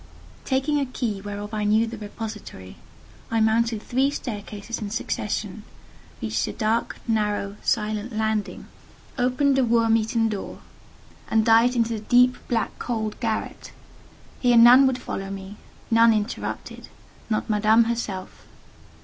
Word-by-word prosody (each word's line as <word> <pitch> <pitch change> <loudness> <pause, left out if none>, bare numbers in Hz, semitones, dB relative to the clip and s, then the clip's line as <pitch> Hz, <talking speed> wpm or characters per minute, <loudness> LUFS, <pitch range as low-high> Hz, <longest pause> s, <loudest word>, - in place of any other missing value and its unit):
Taking 275 +2 +1
a 280 - 0
key 230 -5 -3
whereof 205 +1 -6
I 210 -1 -1
knew 215 +2 +3
the 230 0 -6
repository, 210 - -8 0.5
I 225 - +1
mounted 220 0 +1
three 265 +2 +1
staircases 215 -4 -6
in 210 - -4
succession, 220 - -3 0.6
reached - - -1
a - - -4
dark, 225 +1 -1
narrow, 210 -2 -1
silent 215 +2 -1
landing, 220 -2 -2 0.5
opened 265 +2 +2
a - - +4
worm 230 -1 +3
eaten 225 +1 0
door, 210 -3 -5 0.7
and 220 -1 +2
dived 230 +2 +5
into 230 -1 +1
the 220 - -3
deep, 245 +3 +4
black, 230 -2 -2
cold 220 -3 -3
garret. 225 -3 -4 0.7
Here 245 -2 +4
none 245 +3 +8
would 260 -1 0
follow 195 -6 -5
me—none 210 +4 0
interrupt—not 215 0 -5
Madame 215 +1 +4
herself. 225 -5 -5
225 Hz, 130 wpm, -24 LUFS, 210-240 Hz, 0.7 s, none